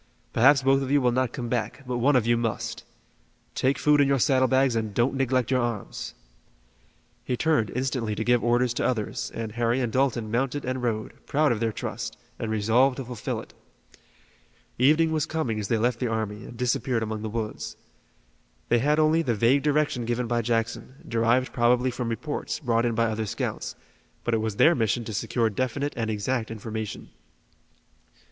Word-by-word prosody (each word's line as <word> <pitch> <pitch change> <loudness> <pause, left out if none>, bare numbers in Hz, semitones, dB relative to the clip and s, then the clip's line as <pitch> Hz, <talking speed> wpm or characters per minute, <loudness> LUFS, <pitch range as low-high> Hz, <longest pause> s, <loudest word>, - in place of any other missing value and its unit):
Perhaps 135 +4 +5
both 135 +1 +4
of 135 - -3
you 145 +1 +4
will 125 -2 +2
not 130 0 0
come 120 - -5
back, 120 +2 -2
but 125 -1 -2
one 140 +4 +3
of 125 -3 +3
you 120 0 +3
must. 115 0 -3 0.7
Take 135 +1 +1
food 150 +2 +4
in 140 - +4
your 140 0 +3
saddle 130 0 +3
bags 130 -2 +3
and 110 -3 -2
don't 120 +3 +2
neglect 130 -2 0
your 130 -1 +3
arms." 120 -4 -4 1.1
He 125 - -2
turned 155 -9 +2
instantly 125 -4 -1
to 110 - -2
give 120 0 +2
orders 120 +1 +2
to - - -2
others 110 -5 -2
and 115 -1 -4
Harry 120 +2 0
and 120 -3 -1
Dalton 125 -5 +1
mounted 135 +4 -1
and 130 0 -2
rode, 110 -3 -3
proud 150 0 +2
of 115 - 0
their 115 0 0
trust, - - -5 0.2
and 115 - -3
resolved 115 +5 +3
to 135 - -5
fulfill 120 -3 -4
it. - - -15 1.3
Evening 155 +5 +4
was 155 -1 0
coming 130 -9 -2
as 105 - -3
they 115 - +1
left 120 +1 0
the 125 - 0
army, 110 -2 -3
and 120 - -10
disappeared 125 -1 0
among 110 -1 -4
the 110 - -4
woods. 110 -1 -4 0.9
They 120 - +4
had 150 +5 +2
only 155 +1 +4
the 125 -8 0
vague 120 +6 +3
direction 145 -4 +1
given 120 +1 -1
by 120 0 0
Jackson, 115 +2 -2
derived 115 +2 +1
probably 125 +1 +3
from 120 -1 -3
reports, 125 +6 -3
brought 120 -4 +1
in 115 - -1
by 115 +1 +2
other 110 -1 -2
scouts, - - -4 0.5
but 120 - -1
it 110 - +2
was 110 -2 -2
their 160 +10 +6
mission 115 - 0
to 110 - -6
secure 115 +2 0
definite 130 +6 -2
and 115 -2 -2
exact 110 +3 -1
information. 110 -1 -6
120 Hz, 190 wpm, -26 LUFS, 115-130 Hz, 1.3 s, their